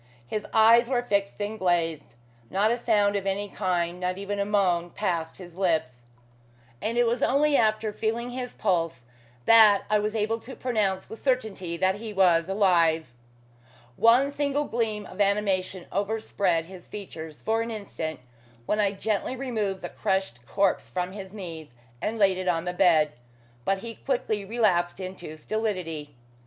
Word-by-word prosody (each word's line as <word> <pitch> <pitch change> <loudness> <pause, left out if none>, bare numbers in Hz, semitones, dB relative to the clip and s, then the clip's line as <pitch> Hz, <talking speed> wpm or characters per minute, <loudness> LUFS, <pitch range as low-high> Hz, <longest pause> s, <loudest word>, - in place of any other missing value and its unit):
His 210 - -4
eyes 230 +2 +6
were 245 -2 +1
fixed 200 -4 -1
and 215 +2 -3
glazed. 165 -7 0 0.3
Not 205 +3 +2
a - - +2
sound 210 -4 +2
of 195 -1 -2
any 200 +1 -1
kind, 180 -3 -1
not 180 0 -2
even 200 +1 -3
a 200 - +1
moan, 185 -4 +1
passed 170 -4 -2
his 175 -3 -11
lips; 160 -9 0 0.8
and 230 +2 -2
it 240 - +5
was 240 +2 0
only 285 +2 +3
after 215 -2 +2
feeling 230 +3 -2
his 250 0 -5
pulse 165 - 0 0.4
that 220 -3 +7
I 210 - +4
was 210 +1 -2
able 220 +1 0
to 255 +4 -10
pronounce 210 -6 -1
with 225 - -10
certainty 215 -10 -1
that 190 +2 +1
he 220 0 -7
was 180 -3 +3
alive. 170 - +2 0.8
One 240 - +5
single 285 0 0
gleam 220 -4 -2
of 185 - -5
animation 195 -2 0
overspread 200 -4 0
his 185 0 -12
features 160 -7 -8
for 225 +1 +1
an 230 - -3
instant 195 - -5 0.4
when 210 - 0
I 200 -1 +2
gently 215 +5 -2
removed 220 -7 -2
the - - -5
crushed 190 -11 -2
corpse 195 +5 +1
from 180 0 -2
his 190 -1 -8
knees, 165 - -8 0.3
and 225 +2 -2
laid 195 -3 +3
it 185 - -4
on 170 -1 +1
the 180 - -2
bed, 165 -5 +4 0.5
but 195 - +2
he 230 - -5
quickly 225 -5 -2
relapsed 195 -6 +1
into 185 -4 -7
stolidity. 165 - -3
200 Hz, 165 wpm, -26 LUFS, 180-220 Hz, 0.8 s, that